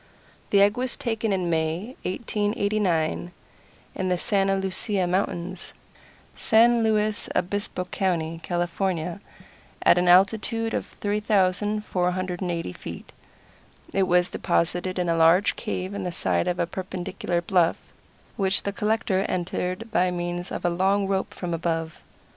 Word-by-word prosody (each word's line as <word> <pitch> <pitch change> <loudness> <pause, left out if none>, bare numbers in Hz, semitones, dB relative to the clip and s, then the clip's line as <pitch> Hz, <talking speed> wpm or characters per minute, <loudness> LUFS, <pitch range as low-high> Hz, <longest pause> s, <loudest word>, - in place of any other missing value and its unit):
The 200 -1 +5
egg 205 +3 +3
was 255 0 -1
taken 225 -2 -1
in 185 -2 0
May, 165 +8 -1
1889, 200 -5 0 0.6
in 185 0 -2
the 180 - +2
Santa 195 0 +1
Lucia 190 0 -1
Mountains, 180 0 -2 0.6
San 235 +1 +4
Luis 215 -1 +1
Obispo 195 -1 -1
County, 165 -4 -1
California, 175 +1 -2 0.6
at 180 - +6
an 180 - +1
altitude 220 +5 +3
of - - -2
3,480 185 - 0
feet. - - -9 0.8
It 195 -1 +2
was 180 0 +3
deposited 175 +1 0
in 180 -1 0
a 165 - +2
large 165 +5 +4
cave 190 -3 -4
in 200 -1 -4
the 180 - -2
side 90 - 0
of 175 - 0
a - - +1
perpendicular 180 0 -3
bluff, 170 -1 +2 0.6
which 195 -1 +2
the 200 - -2
collector 210 -2 0
entered 185 +4 -3
by 180 -3 +3
means 175 0 -3
of - - -4
a - - +4
long 195 +3 +2
rope 195 -1 -1
from 175 -2 -4
above. 165 -1 -2
185 Hz, 130 wpm, -25 LUFS, 175-205 Hz, 0.8 s, at